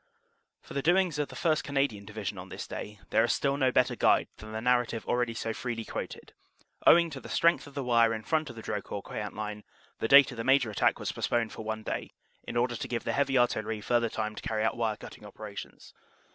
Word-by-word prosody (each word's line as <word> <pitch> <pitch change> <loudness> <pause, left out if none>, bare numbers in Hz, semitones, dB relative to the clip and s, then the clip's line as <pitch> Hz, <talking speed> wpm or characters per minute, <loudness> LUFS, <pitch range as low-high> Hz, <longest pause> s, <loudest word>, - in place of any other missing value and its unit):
For - - -11
the 140 - -1
doings 175 -1 +2
of 145 - 0
the - - -11
1st. 155 -3 +1
Canadian 135 -8 -1
Division 105 -2 -5
on 90 +1 -9
this - - -6
day 105 -1 -7
there 110 - +4
is 115 - +2
still 140 -1 +1
no 130 -2 +2
better 125 0 +2
guide - - +3
than 110 0 -10
the 110 - -3
narrative 120 -1 +1
already 120 -2 0
so 115 -1 -2
freely 115 -1 -4
quoted, - - -6 0.5
"Owing 170 -1 +7
to 135 - -6
the - - -11
strength 170 -2 +3
of 140 - -14
the 140 - -2
wire 115 -2 +4
in 110 -1 -3
front 155 +1 0
of 120 - -9
the 115 - -9
Drocourt 100 -1 -4
Queant 105 -1 -5
line, 105 0 -5 0.4
the - - 0
date 140 +2 +8
of 125 - -9
the 115 - -3
major 130 -3 +3
attack 105 - +2
was - - -3
post - - -3
poned 115 -2 +1
for - - -7
one 110 0 -4
day, - - -4 0.3
in 120 - -3
order 120 0 +1
to 135 +1 -4
give 120 -2 -3
the - - -1
heavy 140 -1 +2
artillery 110 -3 +1
further 120 +2 +1
time 110 0 -3
to - - -8
carry 110 -1 -1
out 110 - +1
wire 110 -2 -1
cutting - - -11
operations. 105 0 -9
115 Hz, 240 wpm, -29 LUFS, 110-135 Hz, 0.5 s, date